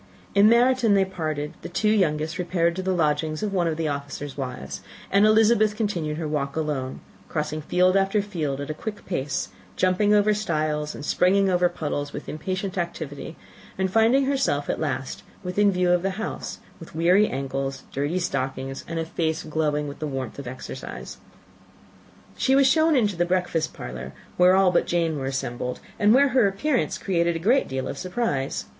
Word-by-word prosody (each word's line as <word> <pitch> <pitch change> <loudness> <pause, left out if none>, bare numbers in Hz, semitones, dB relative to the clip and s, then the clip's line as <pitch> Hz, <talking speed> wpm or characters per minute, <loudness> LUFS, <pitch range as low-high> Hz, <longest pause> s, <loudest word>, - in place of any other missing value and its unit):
In 200 +2 +6
Meryton 240 -2 +4
they 195 -1 +4
parted: 155 -5 -4
the - - -7
two 210 +4 +1
youngest 160 -5 +1
repaired 170 -1 +1
to 190 - -3
the 190 0 -1
lodgings 155 -1 0
of 205 -2 -2
one 175 -3 +1
of 160 -1 -1
the 165 -1 -1
officers' 145 -1 -5
wives, 125 - -5 0.3
and 200 +2 +5
Elizabeth 215 -1 +4
continued 175 -9 -2
her 160 -1 -3
walk 140 -2 -2
alone, 145 -5 -3 0.3
crossing 155 0 -2
field 180 +4 +2
after 195 +2 +2
field 160 -9 -3
at 145 +1 -4
a - - -2
quick 205 +6 -7
pace, 145 -6 -2 0.3
jumping 185 +3 +2
over 210 0 +4
stiles 155 -7 -1
and - - -7
springing 195 +3 +3
over 180 0 +3
puddles, 145 -3 -4
with - - -7
impatient 185 +4 -3
activity, 160 -4 -5 0.4
and 190 0 0
finding 230 +6 +4
herself 265 - 0
at - - -4
last 145 -4 -3 0.2
within 200 +3 +2
view 180 -1 +2
of 175 -1 +3
the 195 - 0
house, 220 - -4 0.2
with - - -12
weary 180 +6 +4
ancles, 135 0 -3
dirty 145 +6 -1
stockings, 135 -4 -3
and 165 - -4
a 165 - -1
face 160 -1 -2
glowing 150 -1 -1
with 140 - -8
the 155 - -3
warmth 135 -3 -5
of 140 - -7
exercise. 130 +1 -7 1.2
She 265 - +2
was 275 0 +5
shown 315 +3 +4
into 210 -7 +2
the 175 - +2
breakfast 175 -3 0
parlour, 60 +1 -7 0.2
where 180 +1 +5
all 190 -1 +5
but 175 - +2
Jane 165 -3 0
were 135 - -3
assembled, 125 -2 -3 0.2
and 205 0 +5
where 275 +4 +5
her 250 -4 +4
appearance 195 -1 0
created 170 -3 0
a 165 +4 -4
great 260 +4 +4
deal 130 0 -3
of 140 - -5
surprise. 180 - -2
170 Hz, 185 wpm, -24 LUFS, 150-200 Hz, 1.2 s, In